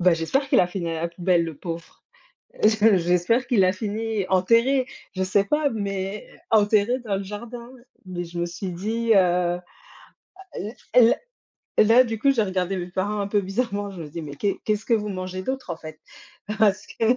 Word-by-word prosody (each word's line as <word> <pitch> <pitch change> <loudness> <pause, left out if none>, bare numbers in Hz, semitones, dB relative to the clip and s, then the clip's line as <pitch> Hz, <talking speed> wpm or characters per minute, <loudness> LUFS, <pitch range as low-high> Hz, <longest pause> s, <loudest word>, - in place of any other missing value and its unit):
bah, 180 -1 +5
j'espère 265 - -1
qu'il - - +5
a 180 - +3
fini 180 -2 -4
à 165 0 -3
la 170 - 0
poubelle, 170 0 +1
le 160 -3 -6
pauvre. 165 +1 -8 0.6
Je 215 -1 +5
j'espère 180 +8 +1
qu'il 230 -6 +4
a 185 - +4
fini 215 +1 -3
enterré. 230 +8 +3 0.3
Je 190 - 0
sais 195 +2 +2
pas, 300 +6 +1
mais 200 -3 -4 0.2
enterré 215 +3 +3
dans 220 -5 -2
le 195 - -3
jardin. 235 +4 -8 0.3
Mais, 180 -1 -4
je 170 +1 -7
me 175 - 0
suis 180 +2 -5
dit, 225 +6 -1
heu 180 -2 +3 1.4
et 250 - +8
là 230 - +6 0.7
et - - +9
là, 230 +4 +6
du 225 -3 -3
coup, 275 +5 +3
j'ai 240 - +1
regardé 190 -2 -1
mes 175 -1 -4
parents 200 +3 -2
un 200 - -1
peu 205 0 +2
bizarrement. 200 0 -2
Je 185 -3 -8
me 155 - -8
dit: 165 +3 -6
«Mais 145 -1 -8
qu'est 200 +7 0
ce - - -23
qu'est-ce 215 0 0
que 230 - +3
vous 210 -1 -2
mangez 185 -1 -5
d'autre, 260 -1 -4
en 170 - -3
fait?» 155 -1 -10 0.6
parce 205 -2 +3
que - - -10
195 Hz, 205 wpm, -24 LUFS, 180-225 Hz, 1.4 s, et